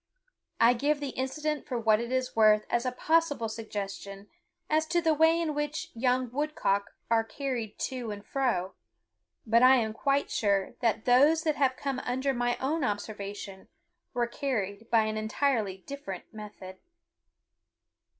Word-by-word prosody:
I 235 +1 +6
give 285 +4 0
the 285 -1 -3
incident 300 +3 -3
for 250 - -2
what 220 -2 +3
it 235 +1 -4
is 255 0 -1
worth 215 -1 +5
as 240 +2 +1
a - - 0
possible 305 -3 +1
suggestion 205 -2 -6 0.4
as 315 +1 +1
to 345 +1 +2
the 325 -2 +2
way 320 +2 +4
in 325 -3 -1
which 295 +1 -3
young 250 +1 0
woodcock 250 -8 -1 0.2
are 225 -1 +4
carried 240 -3 -4
to 250 -3 -5
and 205 -1 -7
fro; 230 -9 -1 0.7
but 230 +1 +4
I 255 +1 +8
am 220 -4 0
quite 275 +5 0
sure 200 -3 +1
that 230 -2 0
those 290 +6 +5
that 310 -2 0
have 265 -2 +2
come 275 -2 -2
under 260 +2 -1
my 245 -1 0
own 295 +4 -1
observation 205 -2 -5 0.5
were 240 -1 +2
carried 230 -5 -3
by 225 -2 +4
an 215 0 -2
entirely 220 -2 0
different 250 -11 -7
method. 205 -3 -10
245 Hz, 155 wpm, -29 LUFS, 215-280 Hz, 0.7 s, I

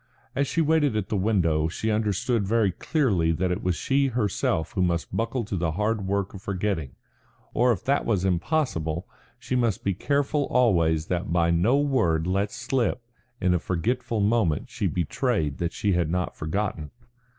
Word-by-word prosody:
As 140 +1 +1
she 165 - 0
waited 150 -5 +2
at 105 -3 -2
the - - -1
window 90 -6 +2
she 110 +6 -2
understood 105 0 0
very 110 -2 +2
clearly 100 - +1
that 90 +3 0
it 90 - -2
was 90 -1 0
she 140 +6 +1
herself 105 -9 -1
who 95 - -1
must 85 -2 0
buckle 115 +1 -1
to 105 -1 -4
the 85 -3 -1
hard 105 +2 -1
work 100 0 -1
of 95 - -9
forgetting. 95 -9 -2 0.6
Or 125 +1 +3
if 105 - -2
that 140 +2 +1
was 100 -5 0
impossible, 85 - -1 0.3
she 130 - -3
must 115 -6 0
be 100 - +1
careful 140 - 0
always 85 -10 +2
that 90 0 -2
by 85 -1 +3
no 95 +11 +3
word 110 - +1
let 100 +3 0
slip 125 -1 -1 0.4
in 90 -1 +2
a 90 - +2
forgetful 115 +7 -1
moment 100 -8 +1
she - - -1
betrayed 85 - -1
that 85 -1 -1
she 105 - -1
had 85 -3 +1
not 90 +1 -2
forgotten. 80 -2 -3
100 Hz, 175 wpm, -25 LUFS, 85-120 Hz, 0.6 s, Or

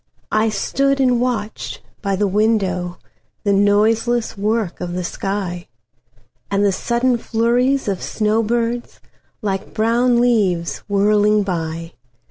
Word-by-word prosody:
I 215 +1 +2
stood 275 +6 0
and 250 -2 +3
watched 225 -4 -3 0.2
by 200 -2 0
the 205 +2 +1
windowThe 190 -4 +1 0.6
noiseless 220 +4 +2
work 210 -2 -1
of 175 -1 -4
the 180 0 -2
sky, 180 -1 -3 0.8
And 200 0 +1
the 200 - +4
sudden 240 +5 0
flurries 245 +4 +1
of 195 -3 -1
snow 215 +1 0
birds, 235 +1 -2 0.4
Like 195 -2 -3
brown 235 +2 +3
leaves 200 -9 +1
whirling 210 +1 +3
by. 165 -2 -4
210 Hz, 115 wpm, -19 LUFS, 195-235 Hz, 0.8 s, the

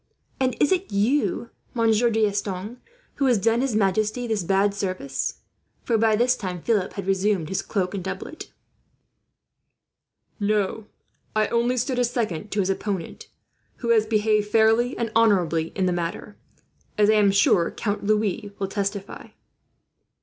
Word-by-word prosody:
"And 260 -1 0
is 295 - +3
it 375 0 0
you, 235 +3 0 0.2
Monsieur 230 0 +3
D'Estanges, 210 0 -1 0.4
who 280 - +1
has 245 -3 +4
done 225 +4 +2
his 265 -5 -1
majesty 215 +4 +1
this 220 -3 -1
bad 195 +3 +2
service?" 185 -9 -3 0.4
For 235 - 0
by 220 0 +3
this 245 +3 +3
time 185 -6 -5
Philip 210 -5 0
had 200 - -5
resumed 195 -3 0
his 190 - -1
doublet 185 -4 -2
and 195 -3 -4
cloak. 315 - -10 2.0
"No. 210 0 0 0.5
I 215 -1 +2
only 240 +2 +1
stood 250 +1 -1
as 245 -1 +2
second 210 -6 -3
to 205 - 0
his 190 0 0
opponent, 195 -3 -4 0.5
who 235 - -5
has 220 -2 +4
behaved 215 -1 +2
fairly 225 +3 +3
and 230 -2 -2
honourably 180 -8 +3
in 190 - 0
the 180 - +1
matter, 175 +4 -4 0.6
as 210 -1 +4
I 215 - +5
am 210 -2 +4
sure 195 -3 +3
Count 205 -2 -3
Louis 210 0 0
will 195 - -2
testify." 200 0 -4
210 Hz, 150 wpm, -24 LUFS, 195-230 Hz, 2.0 s, I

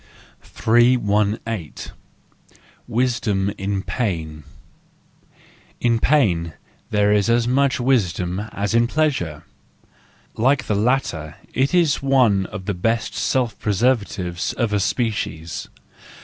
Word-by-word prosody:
318. 110 - +1 1.0
Wisdom 110 -5 0
in 100 -1 -3
Pain 80 - -3 1.4
.—In 115 -1 +2
pain 90 - +2 0.4
there 105 -1 +2
is 105 +1 +2
as 120 0 +2
much 140 +2 +2
wisdom 95 -8 0
as 100 +2 -2
in 115 0 +3
pleasure: 130 - -1 0.9
like 130 +3 +2
the - - -1
latter 105 - 0 0.2
it 135 +6 +1
is 165 -5 +3
one 125 -9 +3
of 95 -2 -8
the 100 - -1
best 115 +6 -1
self 125 -3 -1
preservatives 100 -5 0
of 115 -4 -1
a 105 - +2
species. 100 -7 -2
110 Hz, 105 wpm, -21 LUFS, 95-125 Hz, 1.4 s, in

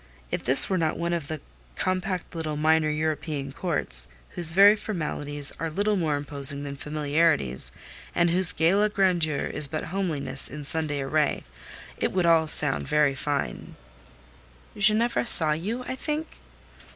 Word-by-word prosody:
If - - -3
this 130 +2 +6
were 190 -2 -1
not 160 -2 -1
one 170 0 -2
of 165 -4 -4
the 155 -1 -6 0.3
compact 185 - -3
little 155 -3 -4
minor 155 0 +2
European 150 -2 -3
courts, 135 - +2 0.2
whose 165 -2 +1
very 200 +3 +6
formalities 150 -8 -2
are 165 - -3
little 205 +6 -1
more 160 -6 -1
imposing 140 -1 +4
than 140 -1 -7
familiarities, 150 - 0 0.4
and 170 0 +2
whose 180 0 +3
gala 195 +6 +1
grandeur 175 -7 0
is 150 -1 0
but 155 +1 -5
homeliness 165 -8 -3
in 145 +1 -9
Sunday 150 -2 -3
array, 150 +2 -1 0.5
it - - -2
would 185 -2 0 0.2
sound 145 -2 +2
all - - -13
very 150 -2 +2
fine." 140 - -5 1.0
"Ginevra 215 +4 +1
saw 160 -8 +7
you, 205 +11 -4
I 260 - -6
think?" 305 +4 -5
155 Hz, 150 wpm, -25 LUFS, 145-185 Hz, 1.0 s, saw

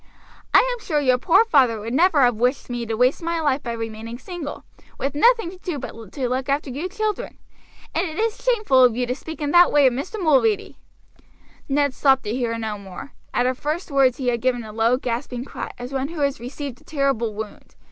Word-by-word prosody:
I - - +6
am 485 - -9
sure 305 -4 0
your 255 -3 +2
poor 345 - +4
father 255 - +3
would 225 +3 -5
never 320 0 +4
have 245 -1 +5
wished 245 +3 -1
me 240 -1 -3
to 225 0 -2
waste 250 +6 +2
my 335 0 -1
life 290 -3 +1
by 235 - -4
remaining 225 0 -6
single, 320 +1 -7 0.3
with 275 +1 -2
nothing 450 +3 +3
to 370 - -13
do 355 -5 -4
but - - -6 0.2
to 265 -4 -2
look 255 +2 -2
after 280 0 0
you 300 +9 -4
children. 425 +1 -3 0.6
And - - 0
it 315 - -8
is 445 0 -1
shameful 425 - +4
of 245 -3 +4
you 250 +1 0
to 245 - -1
speak 320 +4 -9
in 290 - -1
that 350 +2 +6
way 290 -1 +5
of 255 - +4
Mr. 325 - -5
Mulready." 390 +6 +2 0.9
Ned 285 0 +2
stopped 270 -1 +3
to 210 - -3
hear 235 -2 -1
no 220 -2 -4
more. 195 +8 -10 0.2
At 245 - +1
her 255 - +2
first 305 +6 -4
words 270 -3 +3
he 255 -3 0
had 235 -2 -1
given 250 -2 0
a 215 -1 -9
low, 230 +3 +2
gasping 245 0 -4
cry, - - -6
as 245 +2 -7
one 270 0 -1
who 325 -1 -6
has 280 0 0
received 255 +1 -7
a - - -20
terrible 275 -7 -1
wound. 215 0 -8
270 Hz, 225 wpm, -22 LUFS, 245-315 Hz, 0.9 s, I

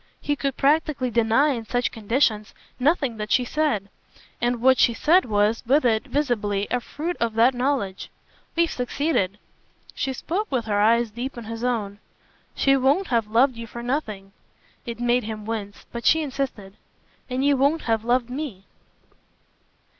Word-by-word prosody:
He 290 - -1
could 275 -2 -3
practically 280 -3 +1
deny 230 +5 +3
in 240 -5 -2
such 245 +1 0
conditions 220 -2 0 0.2
nothing 275 -4 +1
that 210 0 -5
she 250 - +3
said, 245 -9 0 0.5
and 240 0 0
what 260 +1 +4
she 235 - +4
said 350 +9 +4
was, 210 0 +1
with 280 +2 +3
it, 220 -2 +2
visibly, 210 -8 -1
a 250 - +1
fruit 320 +8 -5
of 230 -2 -1
that 235 +3 +5
knowledge. 245 -7 -2 0.5
"We've 335 0 +2
succeeded." 245 - -1 0.6
She 270 - -2
spoke 365 - -3
with 250 -4 0
her 205 -2 +1
eyes 230 +1 +3
deep 245 +4 -5
in 235 - -6
his 225 +1 -6
own. 210 -5 -2 0.6
"She 275 0 +3
won't 275 +8 +2
have 230 -3 +1
loved 245 +4 +3
you 230 0 -7
for 235 +2 -8
nothing." 215 -7 -3 0.6
It 235 -1 -5
made 240 -1 +1
him 215 -1 -6
wince, 210 -2 -5
but 235 0 -6
she 320 0 +4
insisted. 260 -8 -5 0.5
"And 260 +2 -1
you 285 0 +4
won't 285 +4 +2
have 225 -2 0
loved 240 +1 +1
ME." 250 -7 -6
245 Hz, 165 wpm, -24 LUFS, 220-275 Hz, 0.6 s, that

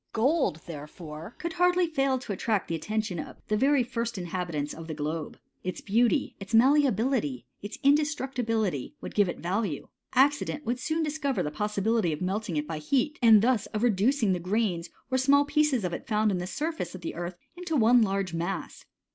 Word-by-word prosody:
Gold, 255 - +1
therefore, 155 +3 -9
could 340 -1 -4
hardly 360 +1 +3
fail 275 -5 +1
to 250 -5 -5
attract 205 +1 -1
the - - -3
at 160 - -6
tention 215 -5 -2
of - - -7
the 215 - +2
very 270 +3 +3
first 235 -2 -3
inhabitants 170 -5 -3
of 160 0 -9
the 160 - -4
globe; 155 +1 -4 0.3
its 185 - -3
beauty, 235 +7 +1
its 200 +3 -3
malleability, 240 - +3 0.2
its 205 +2 -7
indestructibility, 260 - +1
would - - -7
give 205 -3 +3
it - - -4
value: 185 -2 -2 0.3
accident 290 +2 +2
would 240 +2 -1
soon 315 +4 -1
discover 295 -3 -1
the 150 - -3
pos 210 +7 -3
sibility 215 -3 +2
of 150 - -3
melting 190 -1 -2
it 150 0 -2
by 160 -2 -4
heat, 275 - 0
and 220 -3 +7
thus 240 -3 +2
of 215 +1 -3
reducing 225 0 +3
tha 180 - -1
grains 180 -2 -1 0.2
or 260 - +2
small 280 +2 +4
pieces 290 -5 +2
of 180 -1 -2
it - - -6
found 215 -1 +2
on 185 - -1
the 180 - -4
surface 300 - -3
of 185 - -9
the 165 - -4
earth 175 +1 -5 0.2
into 350 -2 -3
one 240 -1 +5
large 195 -4 0
mass. 170 +2 -4
215 Hz, 195 wpm, -28 LUFS, 175-270 Hz, 0.3 s, and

